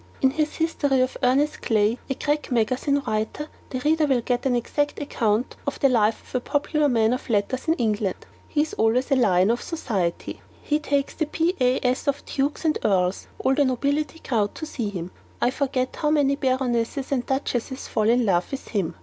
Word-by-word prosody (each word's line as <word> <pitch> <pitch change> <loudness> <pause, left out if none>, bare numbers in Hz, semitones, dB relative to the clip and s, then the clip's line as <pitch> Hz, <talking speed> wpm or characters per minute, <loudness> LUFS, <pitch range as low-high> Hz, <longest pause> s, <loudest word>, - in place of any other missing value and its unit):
In 265 - +3
his 305 +1 -1
'History 290 -5 +1
of 255 - 0
Ernest 275 +4 +2
Clay,' 220 +1 +2
a 270 - 0
crack 295 0 -1
magazine 255 +5 +1
writer, 220 +8 -2 0.2
the 255 - -4
reader 310 +1 +2
will 260 -3 +2
get 245 +2 -1
an 250 - +2
exact 290 +5 -1
account 230 -5 0
of 280 - -2
the 275 - +4
life 225 -3 +2
of - - -18
a 255 - +1
popular 290 +3 0
man 225 -2 +3
of 255 - -5
letters 225 +6 0
in 325 - +3
England. 210 - -1 0.2
He 295 - +1
is 310 - -6
always 230 +5 +1
the 275 - +4
lion 195 -5 +4
of 240 - -1
society. 205 - -3 0.2
He 300 +1 +1
takes 285 -2 -1
the 315 - -2
PAS 265 -6 +1
of 280 0 -1
dukes 285 +4 -2
and 310 - +2
earls; 185 -2 +1
all 265 - +1
the 285 - +3
nobility 280 +5 0
crowd 220 -9 -1
to 315 - -5
see 240 -8 -3
him: 180 -3 -6 0.3
I 245 - +2
forget 260 -2 -1
how 300 - +1
many 285 -2 +3
baronesses 260 -1 -1
and 260 -3 +1
duchesses 265 -1 -2
fall 215 -1 +1
in 240 0 +3
love 180 -3 +1
with 275 - -6
him. 195 -7 -1
255 Hz, 195 wpm, -24 LUFS, 225-290 Hz, 0.3 s, the